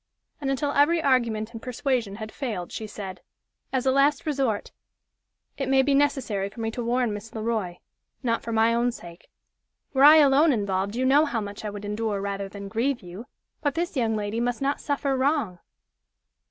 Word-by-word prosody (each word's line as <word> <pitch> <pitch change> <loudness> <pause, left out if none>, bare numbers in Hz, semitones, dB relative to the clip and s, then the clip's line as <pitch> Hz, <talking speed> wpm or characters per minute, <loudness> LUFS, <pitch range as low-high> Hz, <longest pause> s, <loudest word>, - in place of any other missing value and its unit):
And 275 - -1
until 275 +2 0
every 295 +4 +4
argument 235 -6 +1
and 225 - -7
persuasion 250 -4 -1
had 215 0 -7
failed, 215 -11 -4
she 220 - -5
said: 195 -3 -7 0.5
"As 260 -1 -1
a 265 - +4
last 275 +1 +3
resort, 270 -8 -1 0.9
it 270 -1 -1
may 265 0 +5
be 280 +1 +2
necessary 265 -9 +1
for 215 - -13
me 225 0 -2
to 240 +1 -4
warn 240 -1 +1
Miss 210 +2 -8
Le 220 - -4
Roy 215 -6 -2 0.5
not 230 -2 0
for 230 - -5
my 225 +1 +3
own 240 +1 +2
sake. 175 -6 -12 0.6
Were 270 0 +3
I 300 +2 +10
alone 295 +1 +6
involved, 200 -3 -1
you 255 +2 0
know 285 +4 +5
how 250 -6 -1
much 205 0 -7
I 210 - -3
would 205 0 -7
endure 210 0 -2
rather 200 0 -3
than 200 0 -8
grieve 235 +5 -1
you. 185 +7 -9 0.3
But 290 -3 0
this 340 0 -2
young 230 -4 +1
lady 210 +1 -2
must 245 0 -1
not 275 +1 -1
suffer 280 -1 -1
wrong." 260 - 0
235 Hz, 195 wpm, -25 LUFS, 210-275 Hz, 0.9 s, I